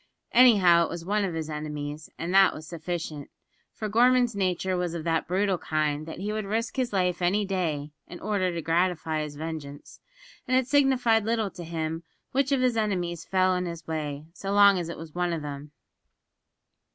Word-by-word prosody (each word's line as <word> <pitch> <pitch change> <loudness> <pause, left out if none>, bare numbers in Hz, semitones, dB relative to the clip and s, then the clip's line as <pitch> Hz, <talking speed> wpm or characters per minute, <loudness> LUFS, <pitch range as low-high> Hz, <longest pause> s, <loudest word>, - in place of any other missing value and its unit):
Anyhow 195 -9 +6
it - - -6
was 170 0 -6
one 205 +2 +1
of 180 -4 -2
his 160 -1 -3
enemies, 150 0 -5
and 170 +2 -3
that 195 -1 +6
was 155 - -9
sufficient, 160 -3 -5 0.4
for 215 - -5
Gorman's 245 +1 +3
nature 185 -1 0
was 175 -1 -2
of 165 - -4
that 165 0 0
brutal 190 0 +1
kind 155 -1 -1
that 160 - -7
he 205 +4 -3
would 215 -1 -3
risk 225 +3 -2
his 255 -2 -1
life 180 -2 0
any 195 +4 +2
day 160 -7 -2 0.2
in 175 - -9
order 195 -4 0
to 170 -2 -4
gratify 165 -2 0
his 150 -1 -6
vengeance, 150 -2 -7 0.5
and 255 - +3
it 260 - +2
signified 260 -6 +3
little 220 -2 0
to 175 - -9
him 160 -1 -3 0.3
which 275 +1 +1
of 270 -2 +2
his 250 -2 +2
enemies 180 -6 -1
fell 185 -1 +2
in 180 0 -2
his 170 -2 -7
way, 150 -2 -4
so 195 +2 -5
long 200 -2 +6
as 170 -1 -4
it 170 - -6
was 160 -1 -10
one 175 -1 -1
of 160 -2 -4
them. 145 0 -7
180 Hz, 195 wpm, -27 LUFS, 160-205 Hz, 0.5 s, Anyhow